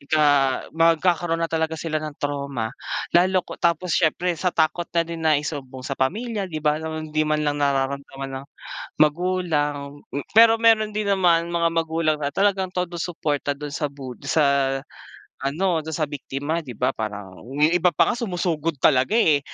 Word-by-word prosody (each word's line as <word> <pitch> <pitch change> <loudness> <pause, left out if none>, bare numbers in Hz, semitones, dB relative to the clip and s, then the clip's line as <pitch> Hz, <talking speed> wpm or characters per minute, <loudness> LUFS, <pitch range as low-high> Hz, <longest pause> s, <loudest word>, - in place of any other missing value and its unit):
Ika 155 +2 0 0.5
magkakaroon 165 +1 +2
na 165 - -5
talaga 160 0 0
sila 155 -1 -2
ng 155 -1 -6
trauma 140 -5 -3 0.4
lalo 185 +1 +3
ko - - -10
tapos 170 0 +1
siyempre 175 +2 +2
sa 185 - +2
takot 170 +1 0
na 170 -1 +1
din 165 0 -6
na 155 -2 +3
isumbong 135 -3 -5
sa 140 - -4
pamilya 205 - -1
di 155 -2 -5
ba 150 +1 +2
alam 160 - -4
mo - - -3
di 155 - +1
man 155 0 +1
lang 145 0 -1
nararamdaman 135 -1 -2
ng - - -12 0.6
magulang. 150 -3 +1 0.4
Pero 225 0 +7
meron 220 -2 +4
din 210 -1 -2
naman 175 -4 +3
mga 170 -1 +1
magulang 160 -1 0
na 140 - 0
talagang 190 +4 +1
todo 180 -2 -3
suporta 145 -4 -2
dun 145 0 -7
sa 150 0 -2
bud 130 -3 -9
sa, 140 -3 +2 0.7
ano 165 +5 0
dun 160 -1 -4
sa 155 -1 0
biktima 145 +3 -3
di 125 - -7
ba? 125 - +1
Parang 105 -3 -5
yung 145 +4 +2
iba 175 +1 +4
pa - - +4
nga - - -2
sumusugod 175 - -1
talaga 130 +9 +4
eh. 160 -11 +4
160 Hz, 175 wpm, -23 LUFS, 140-175 Hz, 0.7 s, Pero